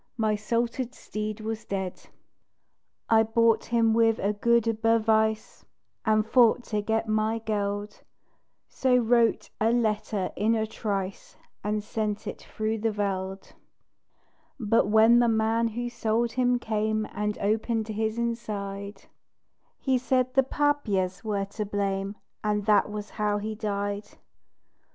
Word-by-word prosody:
My 215 Hz, -2 st, +1 dB
salted 235 Hz, +3 st, -2 dB
steed 215 Hz, 0 st, -5 dB
was 220 Hz, 0 st, -4 dB
DEAD. 190 Hz, -2 st, -5 dB, 1.0 s
I 225 Hz, -1 st, +5 dB
bought 225 Hz, 0 st, +2 dB
him 230 Hz, -1 st, +2 dB
with 225 Hz, -1 st, +3 dB
a 200 Hz, +2 st, 0 dB
good 230 Hz, 0 st, +1 dB
"Bewijs," 220 Hz, -1 st, +1 dB, 0.4 s
And 215 Hz, -1 st, +2 dB
thought 240 Hz, +1 st, +4 dB
to 210 Hz, -3 st, -2 dB
get 220 Hz, +2 st, -1 dB
my 215 Hz, +1 st, +1 dB
geld 205 Hz, -2 st, -3 dB, 0.7 s
So 255 Hz, -1 st, +2 dB
wrote 235 Hz, -1 st, +2 dB
a 220 Hz, +1 st, +3 dB
letter 215 Hz, -4 st, 0 dB
in 220 Hz, +3 st, +2 dB
a 220 Hz, -1 st, 0 dB
trice, 200 Hz, -3 st, -4 dB, 0.3 s
And 210 Hz, 0 st, -1 dB
sent 210 Hz, -1 st, -3 dB
it -, -, -6 dB
through 220 Hz, +1 st, -3 dB
the 225 Hz, +2 st, +1 dB
veld; 195 Hz, -2 st, -3 dB, 1.1 s
But 225 Hz, -2 st, +2 dB
when 220 Hz, +3 st, +6 dB
the 240 Hz, -, +4 dB
man 225 Hz, +1 st, +2 dB
who 240 Hz, +2 st, -3 dB
sold 235 Hz, 0 st, 0 dB
him 250 Hz, 0 st, +2 dB
came 215 Hz, -2 st, -1 dB
And 210 Hz, 0 st, -2 dB
opened 220 Hz, +2 st, 0 dB
his 220 Hz, +1 st, -2 dB
inside 205 Hz, -4 st, -4 dB, 0.7 s
He 260 Hz, -2 st, +1 dB
said 255 Hz, 0 st, +1 dB
the 270 Hz, -, +5 dB
"paapjes" 235 Hz, -10 st, 0 dB
were 205 Hz, -3 st, -1 dB
to 205 Hz, +2 st, -5 dB
blame, 200 Hz, -1 st, -2 dB, 0.3 s
And 210 Hz, -1 st, 0 dB
that 210 Hz, -1 st, +4 dB
was 210 Hz, 0 st, -6 dB
how 210 Hz, 0 st, +2 dB
he 215 Hz, +1 st, -4 dB
died! 205 Hz, -1 st, -3 dB
220 Hz, 135 wpm, -27 LUFS, 210-230 Hz, 1.1 s, when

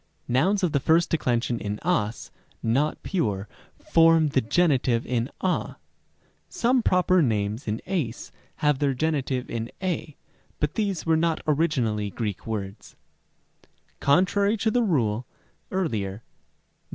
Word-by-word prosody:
Rem. -, -, -43 dB, 0.2 s
c. -, -, -3 dB
Nouns 190 Hz, +10 st, +2 dB
of 175 Hz, -, +2 dB
the 140 Hz, -, +2 dB
first 165 Hz, +5 st, +2 dB
declension 120 Hz, -6 st, 0 dB
in 105 Hz, 0 st, -3 dB
as 150 Hz, -11 st, -1 dB, 0.3 s
not 135 Hz, +7 st, 0 dB
pure 105 Hz, -, -1 dB, 0.3 s
form 165 Hz, -2 st, +4 dB
the 135 Hz, -1 st, +2 dB
geni 150 Hz, +3 st, +3 dB
tive 120 Hz, -2 st, 0 dB
in 120 Hz, +1 st, -1 dB
a. 185 Hz, -1 st, -1 dB, 0.7 s
Some 250 Hz, +1 st, +2 dB
proper 185 Hz, -3 st, +3 dB
names 110 Hz, -2 st, -1 dB
in 110 Hz, +2 st, -2 dB
ys 160 Hz, -12 st, -3 dB, 0.3 s
have 150 Hz, -2 st, +3 dB
their 140 Hz, -2 st, +1 dB
genitive 135 Hz, -3 st, -1 dB
in 115 Hz, 0 st, -4 dB
y, 165 Hz, -5 st, -3 dB, 0.4 s
but 150 Hz, -1 st, 0 dB
these 200 Hz, -6 st, -2 dB
were 165 Hz, -1 st, +3 dB
not 165 Hz, 0 st, 0 dB
originally 130 Hz, -10 st, +1 dB
Greek 105 Hz, -1 st, -4 dB
words, 100 Hz, -2 st, -5 dB
Rem. -, -, -44 dB
d. -, -, -27 dB, 0.3 s
Contrary 200 Hz, +8 st, +3 dB
to 220 Hz, +1 st, +1 dB
the 245 Hz, -, +2 dB
rule 125 Hz, -, 0 dB, 0.4 s
(Rem. 110 Hz, -, -2 dB
145 Hz, 145 wpm, -25 LUFS, 115-175 Hz, 0.7 s, form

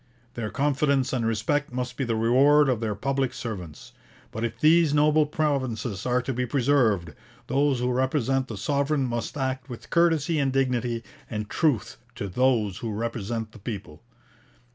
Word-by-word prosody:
Their 115 Hz, -3 st, -4 dB
confidence 140 Hz, -1 st, +1 dB
and 120 Hz, -3 st, 0 dB
respect 120 Hz, +7 st, 0 dB
must 125 Hz, 0 st, -4 dB
be 135 Hz, -, -2 dB
the 115 Hz, -3 st, -1 dB
reward 135 Hz, +6 st, +4 dB
of 125 Hz, -4 st, +1 dB
their 110 Hz, -2 st, -2 dB
public 135 Hz, +4 st, -1 dB
servants. 90 Hz, -10 st, -7 dB, 0.4 s
But 110 Hz, -, -4 dB
if 115 Hz, -1 st, -3 dB
these 155 Hz, -1 st, +4 dB
noble 150 Hz, +1 st, +4 dB
provinces 130 Hz, -, -2 dB
are 125 Hz, 0 st, +1 dB
to 130 Hz, -, -2 dB
be 125 Hz, +1 st, -2 dB
preserved, 115 Hz, -, +2 dB, 0.3 s
those 140 Hz, -1 st, +1 dB
who 125 Hz, 0 st, +1 dB
represent 130 Hz, 0 st, 0 dB
the 110 Hz, -, -6 dB
sovereign 140 Hz, +5 st, 0 dB
must 120 Hz, +1 st, -3 dB
act 130 Hz, 0 st, -2 dB
with 120 Hz, -, -9 dB
courtesy 165 Hz, -2 st, +2 dB
and 135 Hz, -2 st, +1 dB
dignity 125 Hz, -3 st, 0 dB, 0.3 s
and 105 Hz, -1 st, -4 dB
truth 145 Hz, -, 0 dB, 0.2 s
to 100 Hz, -, -4 dB
those 110 Hz, -2 st, +1 dB
who 115 Hz, -, -4 dB
represent 115 Hz, 0 st, -3 dB
the 115 Hz, -, -14 dB
people. 95 Hz, -7 st, -7 dB
125 Hz, 165 wpm, -26 LUFS, 115-140 Hz, 0.4 s, reward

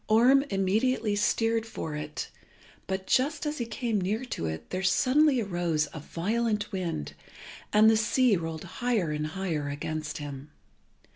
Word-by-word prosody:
Orm 245 Hz, +5 st, +6 dB
immediately 210 Hz, +3 st, +1 dB
steered 225 Hz, +2 st, +1 dB
for 190 Hz, -8 st, -6 dB
it, 150 Hz, 0 st, -5 dB, 0.6 s
but 190 Hz, 0 st, -3 dB
just 290 Hz, +8 st, +1 dB
as 300 Hz, -1 st, -2 dB
he 235 Hz, -, -2 dB
came 225 Hz, -2 st, -1 dB
near 215 Hz, +7 st, -1 dB
to 85 Hz, -, -3 dB
it 80 Hz, 0 st, -6 dB
there 185 Hz, -, -2 dB
suddenly 255 Hz, +9 st, +4 dB
arose 175 Hz, -7 st, 0 dB
a 155 Hz, -, -6 dB
violent 210 Hz, +7 st, -1 dB
wind, 170 Hz, -, -3 dB, 0.6 s
and 215 Hz, +1 st, +6 dB
the 220 Hz, -, +6 dB
sea 225 Hz, +2 st, +3 dB
rolled 165 Hz, -2 st, -4 dB
higher 190 Hz, -1 st, -1 dB
and 150 Hz, 0 st, -2 dB
higher 155 Hz, -4 st, -3 dB
against 155 Hz, +1 st, -4 dB
him. 145 Hz, -1 st, -7 dB
195 Hz, 150 wpm, -28 LUFS, 155-230 Hz, 0.6 s, Orm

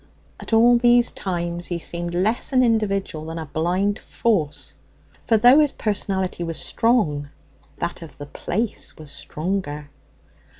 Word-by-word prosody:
at -, -, -9 dB
all 235 Hz, +2 st, +5 dB
these 240 Hz, 0 st, +4 dB
times 175 Hz, -2 st, -3 dB
he 175 Hz, -, -2 dB
seemed 170 Hz, +1 st, -3 dB
less 215 Hz, +10 st, 0 dB
an 255 Hz, -1 st, +4 dB
individual 200 Hz, -8 st, 0 dB
than 165 Hz, +1 st, -6 dB
a 160 Hz, -, -4 dB
blind 180 Hz, +7 st, -1 dB
force. 180 Hz, -11 st, -1 dB, 0.5 s
For 225 Hz, -, +4 dB
though 245 Hz, +6 st, +7 dB
his 295 Hz, -2 st, +3 dB
personality 190 Hz, -4 st, -2 dB
was 165 Hz, -1 st, -4 dB
strong, 160 Hz, -, +1 dB, 0.5 s
that 175 Hz, -, -4 dB
of 165 Hz, -4 st, -11 dB
the 145 Hz, -, -7 dB
place 205 Hz, +9 st, -3 dB
was 155 Hz, -2 st, -10 dB
stronger. 150 Hz, 0 st, -4 dB
185 Hz, 140 wpm, -22 LUFS, 165-225 Hz, 0.5 s, though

